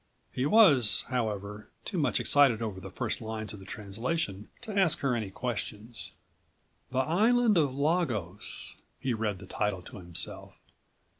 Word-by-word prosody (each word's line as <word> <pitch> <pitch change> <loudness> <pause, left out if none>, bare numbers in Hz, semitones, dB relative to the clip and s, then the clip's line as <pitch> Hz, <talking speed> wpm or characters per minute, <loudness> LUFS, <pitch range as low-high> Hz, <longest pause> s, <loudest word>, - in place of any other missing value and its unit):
He 130 +3 0
was, 145 - +6
however, 105 -4 -3 0.2
too 185 - -2
much 145 - +2
excited 140 -6 +5
over 105 -5 -4
the 95 - -8
first 115 +5 -3
lines 110 -1 -4
of 105 - -9
the 95 - -12
translation 105 - -3
to 220 -4 -6
ask 175 -5 +3
her 135 -3 +1
any 110 -4 -2
questions. 110 +1 -4 0.8
"The 130 - -4
Island 215 - +4
of 145 -6 +2
Lagos." 135 - -1 0.2
He 130 - -1
read 110 -3 -1
the 95 - -11
title 100 -1 -2
to - - -10
himself. 85 -3 -4
115 Hz, 150 wpm, -30 LUFS, 105-145 Hz, 0.8 s, was